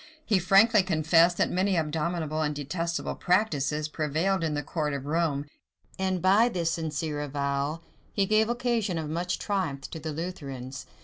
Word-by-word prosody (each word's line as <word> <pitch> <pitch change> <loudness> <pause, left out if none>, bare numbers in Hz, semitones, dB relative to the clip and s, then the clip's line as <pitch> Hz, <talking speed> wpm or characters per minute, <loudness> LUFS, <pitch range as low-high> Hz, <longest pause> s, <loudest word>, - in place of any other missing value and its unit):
He 205 -4 +3
frankly 200 +5 +5
confessed, 170 -1 +3
that - - +1
many 190 +2 +1
abominable 160 0 -1
and 150 -1 -1
detestable 165 +4 -3
practices 155 -6 +1
prevailed 160 +5 0
in 155 -2 0
the 145 - -2
court 150 0 -2
of 140 -1 -5
Rome; 150 -2 0 0.5
and 190 -2 -1
by 205 +6 +5
this 170 -6 -1
sincere 155 -2 -2
avowal, 140 +2 -2 0.3
he 200 - +1
gave 215 +2 +3
occasion 240 -6 0
of 155 -2 -3
much 180 +2 -1
triumph 170 -10 -2
to 160 - -6
the 155 0 -4
Lutherans. 135 -6 -6
165 Hz, 160 wpm, -27 LUFS, 150-185 Hz, 0.5 s, frankly